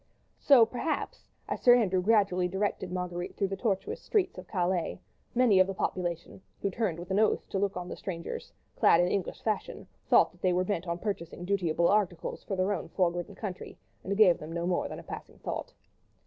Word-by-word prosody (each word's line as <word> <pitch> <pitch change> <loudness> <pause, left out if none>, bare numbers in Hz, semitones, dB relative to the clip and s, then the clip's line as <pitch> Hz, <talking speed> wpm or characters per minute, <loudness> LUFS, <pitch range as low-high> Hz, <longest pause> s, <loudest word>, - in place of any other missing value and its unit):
So, 260 -5 +7
perhaps, 285 - -3 0.2
as - - -3
Sir 245 -1 +8
Andrew 190 -6 +2
gradually 195 -3 +3
directed 190 0 -2
Marguerite 180 -1 -4
through 195 -2 0
the 195 - -2
tortuous 195 -2 -2
streets 380 -4 0
of - - -11
Calais, 180 -2 -1 0.4
many 235 -6 +5
of 185 - +5
the 195 - -4
population, 175 -1 -3 0.2
who 200 - +1
turned 190 -5 -1
with 175 +2 -8
an 195 - +2
oath 220 - +2
to 195 - -1
look 195 -1 -1
at 180 -1 -5
the - - -6
strangers 170 -3 -6 0.2
clad 165 - +5
in 175 - +4
the 180 - -1
English 195 -3 -3
fashion, 215 -3 -2 0.2
thought - - +5
that - - -24
they 185 -1 +2
were 180 +1 +2
bent 185 -3 -2
on 170 0 -1
purchasing 175 -3 -4
dutiable 170 -3 +1
articles 185 -5 0
for 195 - -3
their 185 +2 +1
own 190 - -5
fog 175 -2 +1
ridden 175 -1 -5
country, 195 -4 -7 0.3
and 200 +1 -2
gave 195 -5 +6
them 155 +1 -8
no 170 0 -2
more 180 0 0
than - - -7
a - - -9
passing - - -9
thought. - - -5
185 Hz, 210 wpm, -29 LUFS, 175-205 Hz, 0.4 s, Sir